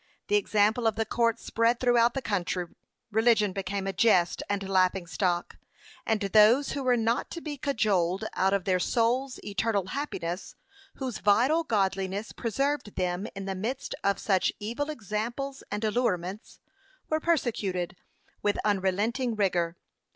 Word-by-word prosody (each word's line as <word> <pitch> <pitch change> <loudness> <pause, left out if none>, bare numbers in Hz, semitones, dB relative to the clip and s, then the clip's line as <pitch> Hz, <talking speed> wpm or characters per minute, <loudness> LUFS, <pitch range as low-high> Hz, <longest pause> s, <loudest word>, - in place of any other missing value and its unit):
The 415 - +3
example 220 - +2
of 220 - +1
the 225 0 0
court 230 +1 +1
spread 230 +1 +1
throughout 240 -1 +3
the 270 - -2
country 180 -3 -1 0.5
religion 220 -2 +3
became 195 0 -3
a 195 - -2
jest 180 -3 +3
and 200 -1 -1
laughing 185 -1 +2
stock; 175 0 -1 0.5
and 220 -1 +2
those 215 +7 +5
who 285 - -3
were 250 -2 +3
not 230 +1 0
to 335 - -6
be 305 -3 -5
cajoled 210 - 0
out 190 +1 +2
of 200 -2 +1
their 185 -1 +2
soul's 245 +7 0
eternal 205 -1 0
happiness 185 - -4 0.4
whose 255 -6 -4
vital 250 +11 +3
godliness 195 - -1
preserved 270 0 -2
them 180 +2 -1
in 195 0 -5
the 195 - -2
midst 235 +9 -4
of 200 0 +2
such 190 -3 +1
evil 240 +8 -3
examples 240 +2 -4
and 210 +2 -3
allurements, 210 -4 -1 0.5
were 310 - 0
persecuted 215 - -1 0.5
with 205 -1 +1
unrelenting 210 +5 0
rigour. 175 -4 0
215 Hz, 145 wpm, -28 LUFS, 190-240 Hz, 0.5 s, those